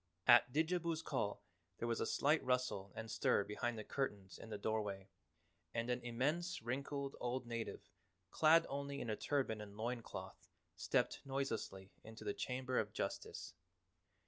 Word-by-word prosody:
At 120 0 +8
Didjabo's 165 +2 +1
call 110 -9 -1 0.3
there 120 - -2
was 115 -1 0
a - - +1
slight 150 +3 +3
rustle 125 -7 0
and 115 0 -5
stir - - +3
behind 115 +3 -2
the 110 - -4
curtains 105 -7 -3
in 115 - -9
the 105 - -3
doorway, 100 -2 -2 0.7
and 115 +1 0
an 125 0 0
immense 145 +10 0
wrinkled 140 +3 -2
old 125 +1 -1
native 115 -1 -4 0.4
clad 160 +1 +6
only 140 0 -3
in 120 -4 -2
a - - +1
turban 130 -7 0
and 105 -1 -9
loin 120 +2 -1
cloth - - -8 0.3
stepped - - +1
noiselessly 115 -8 -2
into 110 0 -9
the 105 -1 -1
Chamber 130 0 -1
of - - -2
Justice. - - -3
120 Hz, 155 wpm, -39 LUFS, 110-140 Hz, 0.7 s, At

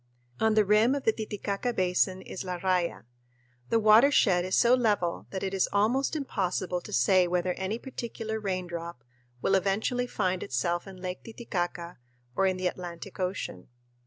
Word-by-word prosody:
On 220 -1 +3
the 215 -1 +4
rim 215 +6 +4
of 280 - -3
the 225 - +3
Titicaca 215 +2 -3
Basin 185 -1 +1
is 190 - -6
La 180 -1 -4
Raya. 180 -1 0 0.7
The - - +3
watershed 215 -4 +5
is 185 - 0
so 240 0 +5
level 210 -8 +1
that 190 - -5
it 195 0 -2
is 190 - +1
almost 235 +9 +1
impossible 185 - -2
to - - -10
say 180 +9 +4
whether 180 +1 0
any 190 +5 -3
particular 230 -3 -5
raindrop 170 - -4 0.4
will - - +2
eventually 205 +6 +1
find 185 -5 -1
itself 170 +9 -1
in 190 -1 -10
Lake 180 0 -5
Titicaca 175 - -4 0.4
or 195 - +3
in 185 -1 0
the 185 - -4
Atlantic 180 +1 -5
Ocean. 180 - -3
190 Hz, 160 wpm, -28 LUFS, 180-220 Hz, 0.7 s, watershed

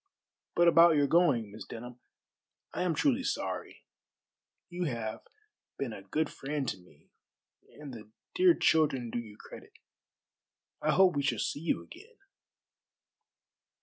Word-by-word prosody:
"But 175 0 +4
about 170 -1 +7
your 145 -1 +4
going, 140 - +2
Miss 110 - -9
Denham, 120 +1 -9 0.7
I - - -3
am 180 -3 +1
truly 270 -3 +2
sorry. - - -4 0.8
You 175 0 -4
have 115 -6 -4 0.6
been 125 -5 -3
a 100 - -8
good 150 +11 -1
friend 140 -1 -4
to - - -4
me, 90 - -23 0.7
and 145 -3 -8
the 110 -2 -11 0.2
dear 360 -2 +5
children 140 -7 +2
do 120 - -2
you 110 -3 -10
credit. - - -13 1.1
I 155 - 0
hope 180 +1 +5
we 140 - +1
shall 135 -4 0
see 140 - -2
you 165 - -1
again." 430 +7 -15
145 Hz, 140 wpm, -30 LUFS, 120-175 Hz, 1.1 s, about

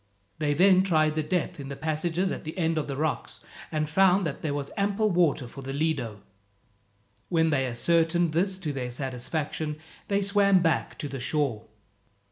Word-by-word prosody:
They 145 -2 +1
then 185 +3 +6
tried 155 -5 +2
the 155 - 0
depth 155 0 -2
in 140 - -6
the 140 - -5
passages 160 +5 -1
at - - -5
the 155 +4 -7
end 165 -2 +1
of 150 - -3
the 140 - -3
rocks, 155 +1 -2 0.3
and 155 -1 0
found 190 +3 +4
that 145 -3 -4
there 155 - -2
was 140 -1 -4
ample 205 +2 +1
water 165 -8 +2
for 135 +3 -10
the 135 0 -5
Lido. 135 -9 -2 1.1
When 160 -2 +2
they 135 -3 +1
ascertained 165 +6 +2
this 185 +4 +1
to 160 -6 -4
their 125 -2 -3
satisfaction 145 +4 -3 0.3
they 200 0 +1
swam 200 -2 +4
back 165 -1 0
to 145 - -4
the 135 -1 -6
shore. 125 -4 -1
155 Hz, 180 wpm, -27 LUFS, 140-180 Hz, 1.1 s, then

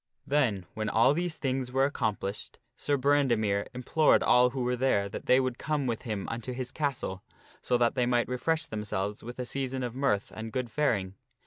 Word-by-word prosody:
Then, 120 -10 +1
when 110 -1 -2
all 115 +6 +4
these 170 0 -1
things 130 -3 -2
were 135 +1 +3
accomplished, 105 -7 -3 0.2
Sir 145 +2 0
Brandemere 120 -8 +2
im 125 - -5
plored 155 +4 +4
all 125 0 +5
who 130 0 -3
were 125 +1 0
there 120 -6 +1
that 100 - -8
they 130 - +6
would 130 -2 -2
come 150 -2 -1
with 115 -3 -2
him 105 -6 -4
unto 120 +2 -4
his 125 0 -4
castle, 135 -11 -2 0.4
so 125 - +1
that 120 -1 +2
they 125 -2 +1
might 120 -1 +2
refresh 155 +6 0
themselves 105 -4 -3
with 120 +1 -8
a 125 - -3
season 130 0 -2
of 120 -2 -3
mirth 130 -6 0
Th( - - -21
abideat - - -10
and 110 0 -5
good 125 -3 -2
faring. 105 -11 0
125 Hz, 210 wpm, -29 LUFS, 110-135 Hz, 0.4 s, they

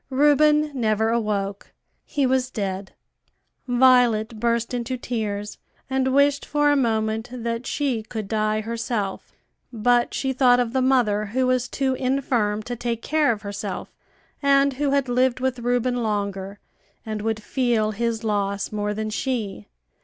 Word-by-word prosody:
Reuben 295 +2 +4
never 220 -3 +1
awoke; 205 -3 -2 0.3
he 285 -3 0
was 255 0 +1
dead. 195 -4 -4 0.7
Violet 245 -3 +4
burst 235 +1 0
into 245 +1 -2
tears, 210 -4 -4 0.3
and 265 0 +1
wished 280 +1 +3
for 295 0 +2
a - - +3
moment 220 -3 0
that 235 -1 -4
she 270 -6 -1
could 215 -1 -6
die 215 0 0
herself; 225 -3 -3 0.4
but 240 +1 +2
she 265 -1 -1
thought 250 -1 +4
of 240 -1 -1
the 260 - +2
mother 240 -6 +2
who 255 +5 0
was 255 0 +1
too 265 +2 -1
infirm 250 -5 0
to 245 +2 -5
take 235 -1 -3
care 305 -3 +2
of 215 -2 -4
herself, 200 -1 -5 0.5
and 280 -1 +4
who 285 +2 -1
had 275 -1 +1
lived 250 +1 +2
with 255 -1 -1
Reuben 245 +1 0
longer 200 -2 -2 0.5
and 215 -1 -4
would 220 0 -1
feel 230 -2 0
his 230 +1 -2
loss 200 -2 -1
more 210 0 -2
than 215 0 -3
she. 215 - -3
235 Hz, 150 wpm, -23 LUFS, 215-260 Hz, 0.7 s, Reuben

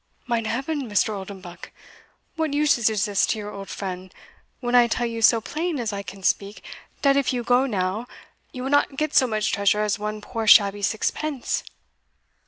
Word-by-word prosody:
"Mine 235 -2 -1
heaven, 270 +3 -3
Mr. 210 +1 +1
Oldenbuck! 190 -3 -9 0.7
what 315 -3 -1
usage 290 -7 +3
is 210 -2 0
this 205 -2 +1
to - - 0
your 210 -1 -6
old 195 -1 -8
friend, 185 -1 -6 0.5
when 240 -1 -3
I 245 -1 +6
tell 240 +1 -1
you 230 -1 -4
so 230 0 +6
plain 315 +6 -3
as 225 -3 -2
I 200 - -3
can 195 -1 -10
speak, 200 +2 -1 0.4
dat 275 -1 +5
if 280 - +1
you 245 -2 -2
go 245 +3 +3
now, 200 +1 -2 0.4
you 255 - -7
will 265 - -3
not 285 -1 +2
get 305 0 -1
so 260 - +5
much 215 -2 -1
treasure 200 +1 +2
as 210 -1 -1
one 210 0 -4
poor 225 +1 -5
shabby 205 -1 +6
sixpence?" 255 +6 -1
225 Hz, 190 wpm, -24 LUFS, 205-255 Hz, 0.7 s, I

